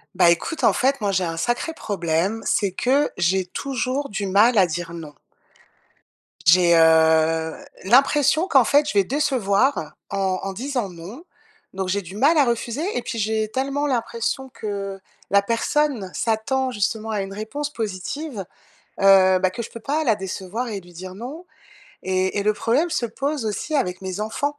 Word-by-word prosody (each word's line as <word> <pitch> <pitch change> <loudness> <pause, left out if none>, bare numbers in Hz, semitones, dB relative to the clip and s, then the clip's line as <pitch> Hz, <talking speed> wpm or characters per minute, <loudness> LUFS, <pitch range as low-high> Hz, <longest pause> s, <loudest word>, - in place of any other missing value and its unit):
Bah, 180 -2 +5
écoute, 320 - -2
en - - +6
fait, 270 -1 +1
moi 205 - 0
j'ai 190 -1 +1
un 165 -1 -3
sacré 240 - -1
problème, 190 - -1
c'est 200 -3 +1
que 265 +9 +1
j'ai 185 +2 +1
toujours 265 +6 -3
du 200 0 -3
mal 210 +5 +4
à 190 - +6
dire 170 0 -5
non. 160 -3 -8 1.3
J'ai, 170 0 +6
heu, 160 0 +4 0.3
l'impression 275 - +3
qu'en 270 -7 +5
fait, 290 +5 +3
je - - -2
vais 200 - +5
décevoir 260 -1 0
en 195 -2 -1
en 195 0 -4
disant 250 +1 -3
non. 180 - -10 0.5
Donc 190 -1 -3
j'ai 200 +2 0
du 185 +1 -11
mal 290 +9 +3
à 290 - +5
refuser 235 +5 -2
et - - -1
puis 235 -1 -5
j'ai 220 0 0
tellement 275 +4 -1
l'impression 235 0 -2
que 200 -5 -5 0.3
la 200 +1 +4
personne 230 0 0
s'attend 255 +4 -1
justement 220 0 -2
à 210 -2 -1
une 195 0 -6
réponse 220 +8 -4
positive, 220 - -5 0.5
heu, 190 -1 +6
bah, 185 0 +2
que 235 - -5
je - - -8
peux 230 - -9
pas 295 +7 -1
la 230 -7 +3
décevoir 195 +4 -5
et 205 -4 -5
lui 175 0 -17
dire 185 +2 -9
non 270 - -8 0.6
et 190 +2 0
et - - -1
le 210 +1 +2
problème 260 +11 0
se 240 - -1
pose 275 +2 -3
aussi 255 +8 -2
avec 180 -8 -2
mes 190 0 -4
enfants. 285 +7 -3
215 Hz, 175 wpm, -22 LUFS, 190-265 Hz, 1.3 s, en